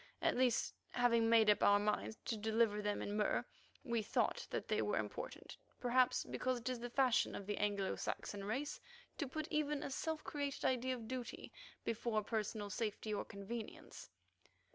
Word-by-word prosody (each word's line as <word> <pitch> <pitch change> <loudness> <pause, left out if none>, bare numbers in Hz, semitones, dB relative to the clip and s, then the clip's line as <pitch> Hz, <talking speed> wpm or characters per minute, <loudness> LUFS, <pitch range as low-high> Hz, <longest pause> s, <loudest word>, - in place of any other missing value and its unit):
At - - +2
least, 250 -2 +2 0.2
having 235 -2 +4
made 225 -1 +6
up 210 -1 +5
our 205 - +7
minds 210 +1 0
to 230 - 0
deliver 220 0 +2
them 205 0 -1
in 205 - -3
Mur, 210 0 +1 0.4
we 235 -4 0
thought 215 - 0
that - - -3
they - - +2
were - - +1
important, - - -4 0.2
perhaps 250 +1 +3
because 255 0 -1
it 240 - -6
is 250 -2 -2
the 245 +1 -4
fashion 255 -1 +3
of 200 - -5
the 205 +1 -2
Anglo 200 -2 +1
Saxon 200 -1 -4
race 260 +9 -2 0.4
to 290 - 0
put 310 +3 -4
even 300 -1 +1
a - - -4
self 315 +3 -2
created 285 -2 -3
idea 255 0 +2
of 230 -3 -8
duty 255 0 -5 0.3
before 225 -1 0
personal 210 -1 -2
safety 215 0 -2
or 205 - -1
convenience. 215 +2 -7
230 Hz, 175 wpm, -38 LUFS, 210-255 Hz, 0.4 s, our